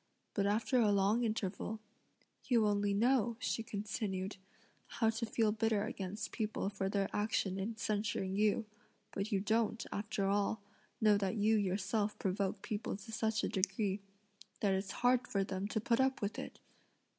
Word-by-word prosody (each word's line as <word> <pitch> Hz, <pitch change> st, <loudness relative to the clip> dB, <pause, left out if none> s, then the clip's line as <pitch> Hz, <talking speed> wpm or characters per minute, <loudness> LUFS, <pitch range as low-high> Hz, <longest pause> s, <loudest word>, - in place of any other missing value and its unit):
But 200 Hz, -1 st, +1 dB
after 225 Hz, +5 st, +2 dB
a 215 Hz, -3 st, +4 dB
long 200 Hz, +4 st, +3 dB
interval, 215 Hz, -1 st, -2 dB, 0.7 s
"You 235 Hz, -4 st, +4 dB
only 205 Hz, -1 st, +2 dB
know," 235 Hz, +2 st, +3 dB
she 250 Hz, -, -1 dB
continued, 200 Hz, -2 st, -3 dB, 0.5 s
"how 225 Hz, -1 st, +1 dB
to 225 Hz, +1 st, -3 dB
feel 220 Hz, -1 st, +2 dB
bitter 220 Hz, -1 st, +1 dB
against 205 Hz, 0 st, -4 dB
people 215 Hz, -3 st, -1 dB
for 195 Hz, -1 st, -2 dB
their 195 Hz, -1 st, +1 dB
action 205 Hz, -2 st, 0 dB
in 220 Hz, +3 st, -3 dB
censuring 205 Hz, -3 st, -1 dB
you: 210 Hz, +2 st, +2 dB, 0.5 s
but 200 Hz, +3 st, -3 dB
you 200 Hz, -, +2 dB
don't, 220 Hz, +2 st, +1 dB
after 205 Hz, -1 st, -2 dB
all, 200 Hz, +2 st, +1 dB, 0.4 s
know 210 Hz, -2 st, +5 dB
that 195 Hz, +2 st, 0 dB
you 215 Hz, +1 st, +3 dB
yourself 205 Hz, +1 st, 0 dB
provoke 195 Hz, +1 st, -1 dB
people 215 Hz, -2 st, -3 dB
to 215 Hz, +3 st, -10 dB
such 220 Hz, -1 st, 0 dB
a -, -, +2 dB
degree, 195 Hz, 0 st, 0 dB, 0.6 s
that 200 Hz, -2 st, +3 dB
it's 190 Hz, +1 st, -1 dB, 0.2 s
hard 250 Hz, 0 st, +4 dB
for 195 Hz, -1 st, +1 dB
them 190 Hz, +1 st, -3 dB
to 220 Hz, -, -1 dB
put 230 Hz, +3 st, +1 dB
up 265 Hz, 0 st, +2 dB
with 205 Hz, +1 st, -2 dB
it! -, -, -7 dB
210 Hz, 165 wpm, -35 LUFS, 195-225 Hz, 0.7 s, know